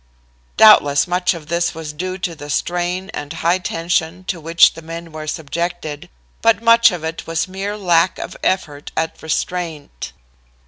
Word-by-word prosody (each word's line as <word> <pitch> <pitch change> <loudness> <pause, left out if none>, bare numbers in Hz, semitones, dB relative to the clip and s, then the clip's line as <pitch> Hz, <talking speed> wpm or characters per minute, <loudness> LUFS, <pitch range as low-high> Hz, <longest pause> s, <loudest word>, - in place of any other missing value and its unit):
"Doubtless 145 -10 +7
much 180 0 +1
of 160 -3 -9
this 170 +1 -1
was 160 -2 -6
due 185 +4 -4
to 180 -2 -3
the 145 -2 -10
strain 175 +5 -2
and 145 -7 -6
the - - -6
high 170 +3 +1
tension 170 0 -2
to 180 -2 -4
which 165 +2 +5
the 165 - -10
men 165 +1 -8
were 155 0 -7
subjected, 160 0 -4 0.3
but 225 -4 +4
much 230 0 +6
of 180 -5 -5
it 160 +1 -5
was 165 +1 -1
mere 195 +2 -4
lack 175 -3 +2
of - - -7
effort 150 -6 -1
at 160 0 -2
restraint. 160 - -4
170 Hz, 170 wpm, -19 LUFS, 160-185 Hz, 0.3 s, Doubtless